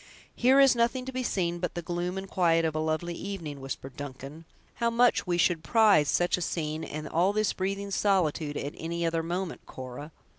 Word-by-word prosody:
"Here 260 +3 +5
is 270 -2 +6
nothing 240 +2 +1
to 265 - -5
be 255 0 -2
seen 175 -7 -1
but 180 0 -3
the 175 - -4
gloom 175 +2 -3
and 190 0 -5
quiet 165 -3 +2
of 160 - 0
a 155 - -2
lovely 160 +2 -1
evening," 165 -7 -6
whispered 135 -1 -6
Duncan; 145 +3 -8 0.3
"how 235 - +1
much 240 +1 +4 0.2
should 175 0 +3
we - - -22
prize 205 -7 +4
such 175 +4 +2
a - - -5
scene, 160 -2 -2
and 155 0 -5
all 180 +6 +2
this 215 -1 +1
breathing 195 +1 -3
solitude, 170 -7 +1
at 145 - -4
any 170 +1 -2
other 165 0 0
moment, 175 +2 -4
Cora! 130 +4 -8
175 Hz, 200 wpm, -28 LUFS, 155-200 Hz, 0.3 s, is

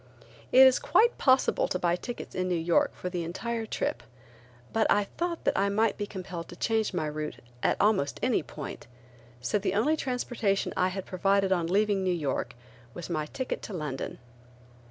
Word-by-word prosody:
It 265 +1 +9
is 260 -1 +5
quite 470 +1 +3
possible 260 -1 +3
to - - -1
buy 175 -1 +1
tickets 240 +6 -7
in 185 0 -1
New 180 - +1
York 165 0 +2
for - - -5
the 175 -2 -2
entire 225 +7 -3
trip, - - -2 0.7
but 225 -1 +3
I 205 - +4
thought 340 - -4
that - - +1
I 200 +1 +2
might 220 +3 +2
be 205 - -4
compelled 185 -4 -6
to - - -10
change 220 +3 0
my 155 - -1
route 150 -2 -4 0.3
at - - +2
almost 200 -9 +2
any - - +2
point, - - -8 0.5
so 205 +11 0
the 195 -1 -1
only 255 +10 +3
transportation 245 -7 -1
I 185 - +2
had 185 0 -4
provided 195 +1 +1
on 175 -3 +2
leaving 200 +1 +2
New 185 - +1
York 145 -7 -2 0.4
was 175 0 -6
my 155 -2 -1
ticket 260 - -4
to 210 - -7
London. 150 -6 -4
195 Hz, 185 wpm, -28 LUFS, 175-225 Hz, 0.7 s, It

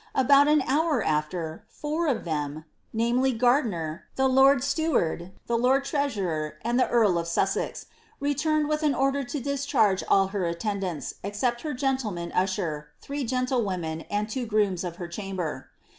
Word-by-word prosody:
About 280 +2 +5
an 300 -2 +4
boor 300 -1 +2
aAer, 155 +1 -1
four 310 +3 -2
of 255 -6 0
them 155 -1 -3
— - - -43
namely, 240 +4 +1
Gardiner, 220 - +1
the 265 0 +3
lord 265 0 +5
steward, 275 - 0
the 235 -1 0
lord 265 +3 +3
treasurer, 195 - -1
and 240 +2 +1
the - - +2
earl 210 -8 +3
of 170 - -4
Sussex 190 +3 -1 0.2
— - - -33
returned 295 +2 +1
with 305 0 0
an 295 -3 +2
order 275 +1 +1
to 260 +4 -4
discharge 265 -7 +1
ill 195 -1 +4
her 195 -2 -2
attendants, 180 -1 -3
except 235 +5 -1
her 300 -3 -3
gentleman 240 -10 -2
usher, 180 -6 -1
three 285 0 -4
gentlewomen, 225 -10 -1
and 205 +1 -1
two 240 +2 -3
grooms 205 -5 +1
of 175 -2 -4
her 175 -1 -6
chamber.' 175 -6 -5
230 Hz, 160 wpm, -26 LUFS, 180-275 Hz, 0.2 s, About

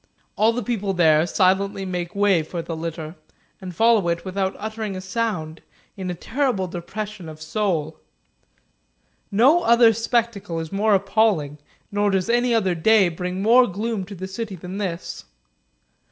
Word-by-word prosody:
All 220 +2 +3
the 240 +1 -3
people 205 -3 -2
there 160 -2 +4
silently 195 +1 +1
make 180 -1 -4
way 200 -4 +3
for 165 +2 -5
the 165 0 -5
litter, 160 -1 -5 0.5
and 180 -2 -8
follow 225 -2 +4
it 170 +1 -1
without 190 0 -2
uttering 215 -1 -5
a - - -4
sound, 185 -5 -3 0.3
in 190 -2 -5
a 180 - -3
terrible 245 - -1
depression 190 +1 -6
of 155 0 -11
soul. 160 -2 -2 1.3
No 265 +12 +4
other 235 -4 +5
spectacle 225 -6 -1
is 160 -1 -6
more 205 +1 +2
appalling, 195 -7 +1 0.3
nor 205 0 +1
does 190 +1 0
any 240 +1 +2
other 205 -6 +2
day 195 +3 +4
bring 180 +3 -4
more 245 +3 +6
gloom 210 +2 -3
to 200 +2 -9
the 190 +1 -6
city 205 +1 -5
than 180 +3 -7
this. 180 -4 -5
195 Hz, 155 wpm, -22 LUFS, 175-220 Hz, 1.3 s, more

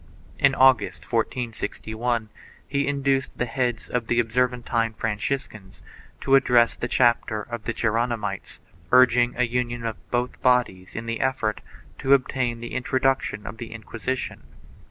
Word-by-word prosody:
In 140 -1 +4
August, 130 -5 +4
1461, 115 -1 -2 0.4
he 140 0 0
induced 140 -1 0
the 125 - 0
heads 120 -1 -2
of 120 -2 -2
the 120 - +2
Obser 120 +2 +2
van 125 -1 -9
tine 115 -2 0
Franciscans 110 -2 -4 0.4
to 135 - 0
address 120 -3 +5
the 120 - -3
chapter 120 -3 +2
of 120 -1 -7
the - - 0
Geronimites 115 -3 -2 0.3
urging 125 -1 +5
a 125 - +3
union 120 0 -2
of 110 -3 -3
both 125 0 -2
bodies 120 -8 +1
in 115 - -4
1 - - -12
the 115 0 -3
effort 125 -5 0 0.4
to 135 - +3
obtain 130 -3 -1
the 120 - -7
introduction 130 -4 0
of 105 - -7
the 115 - -7
Inquisition. 115 +3 -5
120 Hz, 150 wpm, -24 LUFS, 115-130 Hz, 0.4 s, address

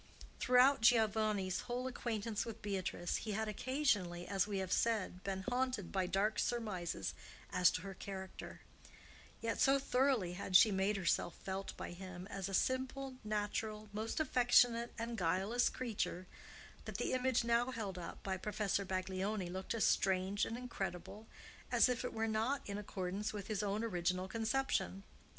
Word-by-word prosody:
Throughout 255 +1 +5
Giovanni's 215 -5 +3
whole 250 +1 -3
acquaintance 230 -4 -2
with 230 -1 -8
Beatrice, 190 -3 -2
he 215 - -4
had 220 +2 -1
occasionally, 210 -7 0
as 195 -1 +1
we 205 -2 -2
have 190 -1 -3
said, 205 -5 +1
been 190 -1 -3
haunted 250 -6 -1
by 190 -2 0
dark 205 +4 +1
surmises 185 - -2 0.4
as 180 -1 +5
to 165 - -2
her 195 -1 -6
character; 190 0 -7 0.8
yet 230 0 -1
so 270 +1 +6
thoroughly 255 -8 +1
had 185 0 -4
she 215 +3 +9
made 195 +2 +1
herself 175 -2 +1
felt 195 0 -5
by - - -5
him 185 0 -8
as 195 0 -3
a - - -6
simple, 260 +2 -1
natural, 215 0 -2
most 220 +6 -2
affectionate, 245 -4 +4
and 230 -1 -3
guileless 190 +8 +2
creature, 215 -7 -3 0.6
that - - -5
the - - -1
image 255 -1 +2
now 235 +1 +2
held 210 -7 -4
up 170 - -8
by 190 -1 -1
Professor 205 0 -1
Baglioni 190 0 -2
looked 190 +4 -3
as 225 - +2
strange 190 +2 +2
and 230 - -4
incredible 215 -3 -5 0.4
as - - +6
if 250 -1 -1
it 250 - -2
were 225 0 -1
not 225 +5 0
in 200 0 -3
accordance 195 +1 -3
with 205 -2 -5
his 215 -1 -2
own 210 +1 -1
original 185 -3 0
conception. 220 - -1
210 Hz, 160 wpm, -36 LUFS, 190-235 Hz, 0.8 s, she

